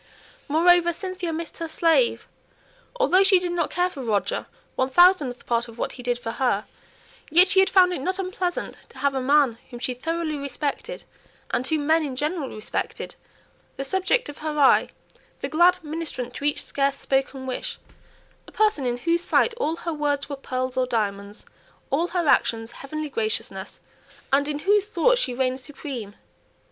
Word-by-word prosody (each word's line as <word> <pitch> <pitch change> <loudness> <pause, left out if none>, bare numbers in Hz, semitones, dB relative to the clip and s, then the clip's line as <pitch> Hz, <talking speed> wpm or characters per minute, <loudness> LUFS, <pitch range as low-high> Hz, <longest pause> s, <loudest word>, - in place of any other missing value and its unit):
Moreover, 345 +3 +4
Cynthia 370 -1 -4
missed 330 +2 -6
her 330 - -3
slave, 330 +9 +2 0.7
although 485 -7 +4
she 385 -1 +6
did 355 -1 -2
not 345 -3 0
care 360 0 +1
for 280 - -7
Roger 215 -5 -1 0.3
one 260 0 +1
thousandth 310 -5 +4
part 235 0 0
of 230 0 -13
what - - -2
he 250 - -10
did 245 0 -1
for 230 -2 -5
her; 230 -4 0 0.6
yet 350 +4 +6
she 380 - +4
had 385 0 +5
found 365 -1 +5
it 310 - -4
not 370 +6 -1
unpleasant 370 -2 -3
to - - -17
have 280 -1 +1
a 265 - -1
man 270 -3 +3
whom 240 -2 -9
she 250 +1 -2
thoroughly 325 +4 -2
respected, 290 - -4 0.5
and 255 - 0
whom 310 -2 0
men 320 +2 +4
in 275 -4 -4
general 300 0 -2
respected, 215 0 -4 0.6
the 275 - -2
subject 380 - +1
of 290 - -9
her 305 -1 -3
eye, 280 -2 +5 0.5
the - - -1
glad 345 +3 +4
ministrant 300 -6 -4
to 280 - -6
each 295 - 0
scarce 275 0 0
spoken 270 -1 -1
wish, 470 - -4 0.7
a - - -12
person 425 -11 +1
in 240 0 -1
whose 335 +6 +1
sight 465 - +2
all 330 -9 0
her 335 0 -4
words 290 -2 -1
were 285 - -4
pearls 255 -1 -3
or 255 -1 +2
diamonds, 205 -3 -3 0.5
all 325 +5 +2
her 350 -3 -1
actions 225 -3 +2
heavenly 310 +2 -5
graciousness, 215 -6 -3 0.5
and 285 +1 +4
in 295 -1 -2
whose 405 +5 +2
thoughts - - +3
she 250 - -1
reigned 260 0 0
supreme. 260 -7 -7
295 Hz, 175 wpm, -24 LUFS, 255-350 Hz, 0.7 s, she